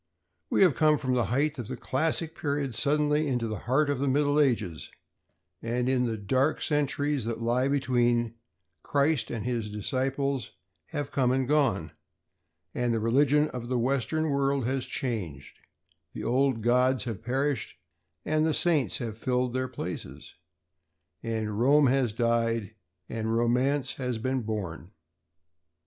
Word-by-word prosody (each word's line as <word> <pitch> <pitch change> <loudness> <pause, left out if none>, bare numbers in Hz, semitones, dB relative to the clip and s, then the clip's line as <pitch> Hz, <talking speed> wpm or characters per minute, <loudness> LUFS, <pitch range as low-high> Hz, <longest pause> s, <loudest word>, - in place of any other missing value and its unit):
We - - +4
have 180 -6 +5
come 155 +2 +3
from 130 -2 -1
the 120 -3 +2
height 140 +7 0
of 120 - -5
the - - -5
classic 160 +3 -1
period 140 -4 -2
suddenly 150 +5 +1
into 125 -4 -1
the 110 -2 -4
heart 145 +4 +3
of 145 -2 -1
the 140 - 0
Middle 145 +2 +2
Ages; 110 - 0 0.7
and 120 +2 -1
in 130 -1 +2
the 115 -1 -2
dark 130 +9 +1
centuries 145 -3 0
that 115 0 -3
lie 120 +3 +1
between, 120 -4 +1 0.5
Christ 145 0 +1
and 115 -2 -4
His 120 -4 -2
Disciples 135 +5 -2 0.3
have 145 -4 -4
come 125 -3 +2
and 130 0 +1
gone, 130 - +1 0.8
and 120 -1 0
the 115 - +1
religion 140 +6 +3
of 120 -2 -6
the 125 0 0
Western 140 +5 0
World 140 -2 +1
has 130 0 -1
changed; 90 - -4 0.5
the - - -6
old 130 -2 +1
gods 125 +2 +3
have 115 -5 -5
perished 130 +1 -1 0.5
and 155 0 +1
the 160 -1 +1
saints 150 - +1
have 115 -2 -5
filled 125 0 0
their 130 0 -1
places. - - -7 0.9
And 110 -2 -3
Rome 140 +4 +5
has 130 -3 +2
died, 115 -2 0 0.3
and 110 0 -2
Romance 130 +4 +1
has 125 -3 -2
been 130 +3 -1
born. 95 -6 -5
130 Hz, 150 wpm, -28 LUFS, 115-140 Hz, 0.9 s, have